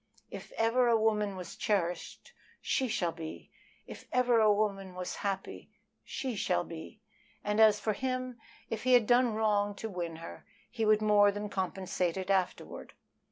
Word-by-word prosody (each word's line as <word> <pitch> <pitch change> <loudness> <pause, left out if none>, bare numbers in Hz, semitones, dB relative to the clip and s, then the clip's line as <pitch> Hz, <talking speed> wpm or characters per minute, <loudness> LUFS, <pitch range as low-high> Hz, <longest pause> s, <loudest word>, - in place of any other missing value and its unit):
"If - - -9
ever 235 +2 +2
a 230 -1 +4
woman 210 -2 +1
was 180 -2 -8
cherished 195 - -2 0.3
she 260 - 0
shall 175 -7 0
be! 160 -1 -9 0.3
If - - -11
ever 250 -2 +3
a 215 -1 +5
woman 200 -3 -1
was 180 0 -5
happy 195 -1 -4 0.3
she 260 -4 -4
shall 180 -3 0
be!" 170 +6 -10 0.4
And 210 +1 0
as 215 -2 +6
for 215 +1 0
him, 255 0 -3 0.3
if 220 -2 -4
he 255 0 +3
had 245 -3 +6
done 245 -1 +3
wrong 205 -2 +1
to 220 +1 -6
win 170 -3 -4
her, 165 +1 -9 0.3
he 225 -2 -1
would 215 0 +4
more 205 -1 +5
than 205 +1 -5
compensate 185 -2 -2
it 190 +1 -2
afterward. 190 -2 -2
210 Hz, 165 wpm, -31 LUFS, 190-225 Hz, 0.4 s, as